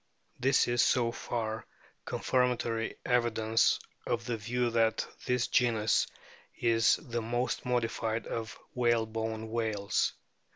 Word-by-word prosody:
This 135 +2 +3
is 120 0 +3
so 115 +1 +3
far 110 -2 -4 0.4
confirmatory 120 -3 0
evidence 115 -2 +2 0.3
of 120 -1 -1
the 120 - -1
view 120 +3 -1
that 115 -1 +2 0.2
this 125 -1 +2
genus 110 -3 +2 0.5
is 115 -1 +4
the 120 -5 -4
most 120 +3 -2
modified 115 -2 -1
of 115 -2 -4 0.2
whalebone 110 -2 0
whales. 110 -3 0
115 Hz, 110 wpm, -31 LUFS, 110-120 Hz, 0.5 s, is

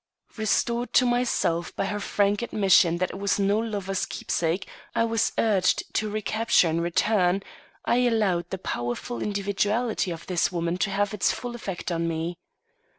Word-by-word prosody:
Restored 235 +2 0
to 255 - +5
myself 215 -9 0
by - - -1
her 205 +2 -2
frank 205 +1 +1
admission 190 -7 +4
that 185 +1 -1
it 190 - -8
was 200 0 +1
no 200 +1 +2
lover's 200 -4 -2
keepsake 170 +3 -2 0.3
I - - +3
was 225 -1 +1
urged 200 -5 +1
to 215 - 0
recapture 215 -2 +2
and 165 +1 0
return, 180 +2 +2 0.4
I 240 - +2
allowed 190 -7 +1
the 190 - -3
powerful 120 -7 -4
individuality 205 +2 0
of 170 -1 -6
this 180 0 +1
woman 170 0 -2
to 200 - +1
have 200 +1 0
its 210 - +2
full 245 -1 -5
effect 195 -6 -5
upon 165 0 -1
me. 165 +2 -3
195 Hz, 160 wpm, -26 LUFS, 175-215 Hz, 0.4 s, to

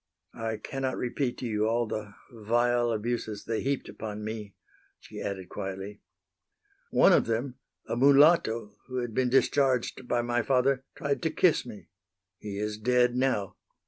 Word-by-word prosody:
"I 110 -1 -2
cannot 135 +1 -3
repeat 125 0 -2
to - - -5
you 110 -2 0
all 120 +1 +1
the 105 -2 -5 0.2
vile 120 +1 +1
abuses 110 -1 -3
they 115 -1 -2
heaped 140 0 -1
upon 105 -1 -6
me," 105 -2 -6 0.4
she - - -10
added, 95 -2 -5
quietly. 95 +2 -6 0.9
"One - - +5
of - - +3
them, 125 +3 -2 0.3
a - - -3
mulatto 135 -6 +4
who 130 - -7
had 120 -2 -3
been 125 +1 +1
discharged 130 -1 +2
by 120 -1 +1
my 120 0 0
father, 130 +2 +1
tried 140 -3 -2
to 165 - +1
kiss 160 -4 +2
me. 105 -7 -11 0.5
He 100 -1 -6
is 105 0 -3
dead 125 +2 +3
now." 125 -7 0
120 Hz, 155 wpm, -28 LUFS, 105-130 Hz, 0.9 s, One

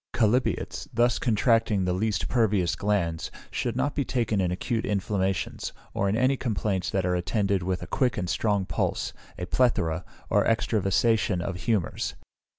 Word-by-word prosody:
Chalybeates, 120 +2 +1
thus 120 0 +2
contracting 115 -3 +2
the 90 - +1
least 105 +2 0
pervious 100 -7 +2
glands, 90 -5 -1 0.2
should 120 -2 -2
not 140 +3 0
be 145 - 0
taken 115 -6 0
in 90 - +1
acute 110 +5 -1
inflammations, 95 -2 -1 0.2
or 100 - +1
in 105 - +1
any 130 +3 +3
complaints 105 -6 -1
that 95 -2 0
are 90 - +1
attended 95 +2 0
with 90 0 -2
a - - -4
quick 130 -3 0
and 90 -3 -1
strong 100 +1 +1
pulse, - - -1 0.2
a 90 - -3
plethora, 90 -8 +1 0.2
or - - +3
extravasation 110 -2 +2
of 90 +1 -3
humours. 105 -7 0
105 Hz, 155 wpm, -27 LUFS, 95-115 Hz, 0.2 s, any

